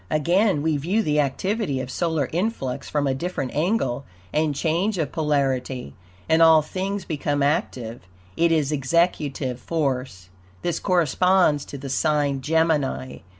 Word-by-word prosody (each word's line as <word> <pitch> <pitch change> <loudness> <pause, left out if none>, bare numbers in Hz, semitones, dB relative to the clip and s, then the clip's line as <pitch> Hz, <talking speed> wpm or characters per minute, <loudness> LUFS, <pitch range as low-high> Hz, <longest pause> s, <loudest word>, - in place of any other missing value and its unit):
Again 170 +2 +2
we 160 -2 +1
view 185 +10 0
the 150 -3 +1
activity 150 - -1
of 130 0 -5
solar 160 -5 0
influx 160 - -2
from 145 -1 0
a 135 - +1
different 135 -2 -3
angle 150 - 0 0.3
and 155 -1 +1
change 170 +8 0
of 155 -4 -1
polarity, 135 - -1 0.3
and 160 +1 +3
all 160 -1 +7
things 190 +3 -3
become 145 -2 -1
active, 125 -5 -1 0.3
It 170 0 +3
is 155 -3 +2
executive 140 -3 0
force. 130 - -3 0.3
This 175 - -1
corresponds 180 -3 +2
to 140 - -8
the 135 +1 -7
sign 145 0 +1
Gemini. 150 -4 0
150 Hz, 140 wpm, -23 LUFS, 135-170 Hz, 0.3 s, all